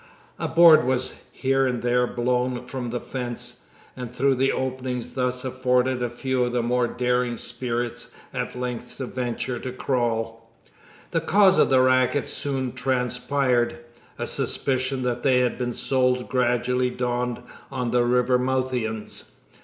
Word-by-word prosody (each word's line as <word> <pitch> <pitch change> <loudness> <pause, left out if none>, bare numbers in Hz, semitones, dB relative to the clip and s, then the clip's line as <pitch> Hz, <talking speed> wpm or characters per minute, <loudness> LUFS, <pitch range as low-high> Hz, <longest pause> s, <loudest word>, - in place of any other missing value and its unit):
A - - -1
board 165 -3 +7
was 130 0 -1
here 135 0 +1
and 125 -2 -2
there 125 0 +2
blown 125 +1 -1
from 125 -1 -5
the 120 +1 -2
fence, 125 -1 -5 0.3
and 125 -2 -6
through 135 +2 +2
the 135 +1 +2
openings 125 -2 -3
thus 125 0 -1
afforded 130 0 +1
a 120 - 0
few 130 +1 -1
of 120 0 -1
the 120 -1 +1
more 120 +1 +1
daring 125 -1 0
spirits 120 -1 -3 0.2
at 125 - -4
length 125 -1 -5
ventured 125 -1 -3
to 130 - -4
crawl. 115 -3 -2 0.6
The - - +1
cause 195 -1 +5
of - - +5
the 130 -1 +5
racket 130 +2 +3
soon 135 -3 -2
transpired. 125 -1 0 0.4
A - - -2
suspicion 130 0 0
that 120 -1 -1
they 130 -2 +4
had 125 0 0
been 120 -1 -1
sold 125 -1 +1
gradually 125 0 +1
dawned 125 -1 -2 0.3
on 125 -3 -2
the 120 0 +3
Rivermouthians. 125 -2 0
125 Hz, 145 wpm, -24 LUFS, 120-130 Hz, 0.6 s, board